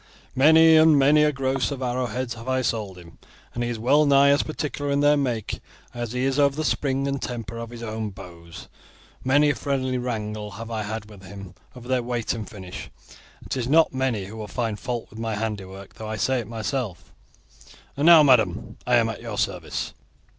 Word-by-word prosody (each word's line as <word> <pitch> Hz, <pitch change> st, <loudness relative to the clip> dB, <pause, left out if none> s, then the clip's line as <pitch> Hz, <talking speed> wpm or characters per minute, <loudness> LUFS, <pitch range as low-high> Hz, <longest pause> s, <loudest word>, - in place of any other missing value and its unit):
Many 160 Hz, +4 st, +7 dB
and 155 Hz, -1 st, +6 dB
many 145 Hz, +2 st, +5 dB
a 150 Hz, -, +3 dB
gross 135 Hz, -1 st, -1 dB
of 135 Hz, -2 st, -5 dB
arrowheads 125 Hz, 0 st, -2 dB
have 115 Hz, +1 st, -11 dB
I 130 Hz, 0 st, +1 dB
sold 105 Hz, -6 st, -2 dB
him, 85 Hz, -2 st, -15 dB, 0.3 s
and 120 Hz, -, -2 dB
he 120 Hz, -, -2 dB
is 120 Hz, -, -3 dB
well 145 Hz, +7 st, +3 dB
nigh 140 Hz, 0 st, +6 dB
as 140 Hz, 0 st, +4 dB
particular 145 Hz, -2 st, -4 dB
in 140 Hz, 0 st, +1 dB
their 145 Hz, +1 st, +5 dB
make 125 Hz, -7 st, -2 dB, 0.3 s
as 120 Hz, -1 st, -5 dB
he 125 Hz, 0 st, -1 dB
is 135 Hz, +1 st, 0 dB
over 140 Hz, -1 st, +3 dB
the 155 Hz, -, -2 dB
spring 135 Hz, -2 st, 0 dB
and 140 Hz, -1 st, -2 dB
temper 115 Hz, -2 st, -5 dB
of 115 Hz, -1 st, -6 dB
his 120 Hz, -1 st, -9 dB
own 110 Hz, -1 st, -4 dB
bows. 85 Hz, -3 st, -12 dB, 0.6 s
Many 145 Hz, +3 st, +4 dB
a -, -, -1 dB
friendly 130 Hz, -3 st, -1 dB
wrangle 105 Hz, -3 st, -4 dB
have 115 Hz, +1 st, -8 dB
I 110 Hz, -1 st, -2 dB
had 110 Hz, 0 st, -5 dB
with 105 Hz, -3 st, -14 dB
him 100 Hz, -1 st, -10 dB, 0.2 s
over 125 Hz, -1 st, -11 dB
their 130 Hz, -1 st, +1 dB
weight 120 Hz, -1 st, -2 dB
and 110 Hz, -4 st, -6 dB
finish, 95 Hz, -3 st, -9 dB, 0.5 s
and -, -, -17 dB
it -, -, -3 dB
is 120 Hz, -2 st, -2 dB
not 160 Hz, 0 st, +4 dB
many 130 Hz, -7 st, -1 dB
who 110 Hz, +2 st, -7 dB
find 115 Hz, -2 st, -3 dB
fault 120 Hz, -2 st, -4 dB
with 110 Hz, -, -11 dB
my 115 Hz, -1 st, -2 dB
handiwork, 100 Hz, -3 st, -5 dB
though 110 Hz, -1 st, -8 dB
I 110 Hz, -, -3 dB
say 130 Hz, +3 st, +1 dB
it 115 Hz, -, -6 dB
myself; 115 Hz, -2 st, -4 dB, 0.8 s
and 145 Hz, +4 st, +1 dB
now, 165 Hz, -3 st, +9 dB
madam, 120 Hz, -4 st, +2 dB
I 125 Hz, -, +4 dB
am 115 Hz, -1 st, +4 dB
at 115 Hz, -, -5 dB
your 115 Hz, -3 st, -6 dB
service." 90 Hz, -5 st, -3 dB
120 Hz, 210 wpm, -24 LUFS, 110-135 Hz, 0.8 s, now